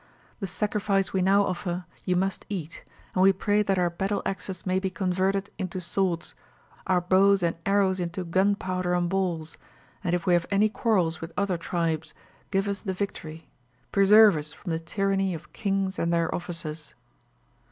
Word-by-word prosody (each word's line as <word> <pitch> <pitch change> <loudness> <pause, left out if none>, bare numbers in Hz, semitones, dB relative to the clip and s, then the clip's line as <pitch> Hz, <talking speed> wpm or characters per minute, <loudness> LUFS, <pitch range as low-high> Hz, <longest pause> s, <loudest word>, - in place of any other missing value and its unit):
The 195 - -3
sacrifice 200 0 0
we 190 - +1
now 195 +2 +4
offer 180 -1 -3 0.2
you 180 - +1
must 190 +2 -1
eat, 170 -6 -5 0.3
and 185 - +1
we 195 +1 +7
pray 205 +2 +1
that 195 -2 +1
our 175 -1 +2
battle 195 +4 -2
axes 190 -1 -4
may 185 0 +1
be 190 0 -1
converted 190 +2 0
into 185 -1 -3
swords, 180 -1 -1 0.5
our 185 -1 +3
bows 190 +2 +4
and 170 - +1
arrows 195 -2 +3
into 175 +1 -3
gunpowder 185 0 +1
and 175 0 +1
balls; 175 -4 -2 0.4
and, 175 -1 +1
if 175 - -3
we 180 - +3
have 175 -1 +2
any 205 +2 +3
quarrels 185 -8 +1
with 165 +1 -6
other 200 -2 +1
tribes, 165 -2 -2 0.3
give 195 0 0
us 200 -1 -2
the 190 -3 -3
victory. 165 -5 -5 0.4
Preserve 205 -1 +7
us 150 0 -6
from 175 - -7
the 160 - 0
tyranny 195 +2 0
of 155 -1 -11
kings 195 -2 -1
and 170 - +1
their 170 -1 +1
officers.' 165 -3 -6
185 Hz, 175 wpm, -26 LUFS, 175-195 Hz, 0.5 s, we